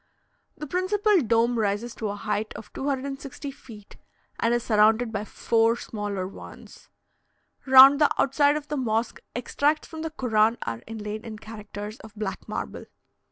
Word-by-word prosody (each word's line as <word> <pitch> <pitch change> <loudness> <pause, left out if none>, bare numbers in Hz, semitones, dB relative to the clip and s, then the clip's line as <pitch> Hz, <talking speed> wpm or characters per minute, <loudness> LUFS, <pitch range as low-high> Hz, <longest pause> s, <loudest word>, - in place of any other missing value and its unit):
The 300 - -6
principal 380 +4 +2
dome 235 0 +2
rises 215 +3 -1
to 215 - -4
a 200 - -3
height 210 +1 -3
of 220 - -10
260 275 0 -4
feet, 220 -6 -14 0.4
and 230 - +2
is 240 0 +1
surrounded 220 +1 +3
by 210 -1 -3
four 230 +1 +2
smaller 205 -5 -4
ones. 195 - -13 0.8
Round 265 +2 +9
the 295 - +6
outside 285 +2 +3
of 295 -1 -7
the 295 - -3
mosque 230 -2 -1 0.2
extracts 290 +5 0
from 320 -1 -8
the 320 - -3
Koran 230 -6 +2
are 115 0 -4
inlaid 215 -1 -6
in 220 -2 -8
characters 210 0 -8
of 220 0 -13
black 210 -2 -5
marble. - - -5
230 Hz, 155 wpm, -25 LUFS, 215-275 Hz, 0.8 s, Round